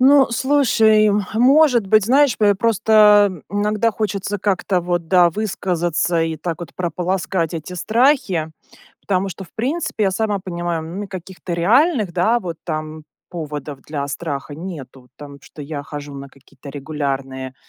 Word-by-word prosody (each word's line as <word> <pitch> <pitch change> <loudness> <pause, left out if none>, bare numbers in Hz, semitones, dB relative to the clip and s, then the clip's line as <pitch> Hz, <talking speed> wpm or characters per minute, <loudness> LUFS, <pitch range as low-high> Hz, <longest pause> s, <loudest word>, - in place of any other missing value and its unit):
Ну, 270 0 +6
слушай. 225 -5 +3 0.2
Может 250 -2 +4
быть, 215 0 +4
знаешь, 275 0 +4
п 205 -2 +4
просто 210 -3 +4
иногда 210 +2 +1
хочется 205 -1 -3
как-то 190 -1 0
вот, 175 -1 -2
да, 180 -2 +5
высказаться- 175 -4 -1
и 160 -1 -2
так 170 -1 -4
вот 170 - -9
прополоскать 175 -1 -2
эти 165 +3 -6
страхи. 215 - +1 0.5
Потому 195 0 -1
что 190 +2 -8
в - - -21
принципе 255 -2 -2
я 190 - +2
сама 210 +1 -1
понимаю, 175 -3 -4 0.2
м, 200 - -7
каких-то 185 -2 -8
реальных, 215 - +2
да, 220 +8 +2
вот 170 -4 -6
там 155 -1 -5 0.3
поводов 150 -4 -6
для 145 -2 -4
страха 140 +1 -5
нету. 135 -8 -9
Там, 145 -1 -11
что 150 - -12
я 145 0 -6
хожу 145 -2 -8
на 140 0 -8
какие-то 140 0 -16
регулярные, 135 -2 -4
180 Hz, 145 wpm, -19 LUFS, 155-215 Hz, 0.5 s, Ну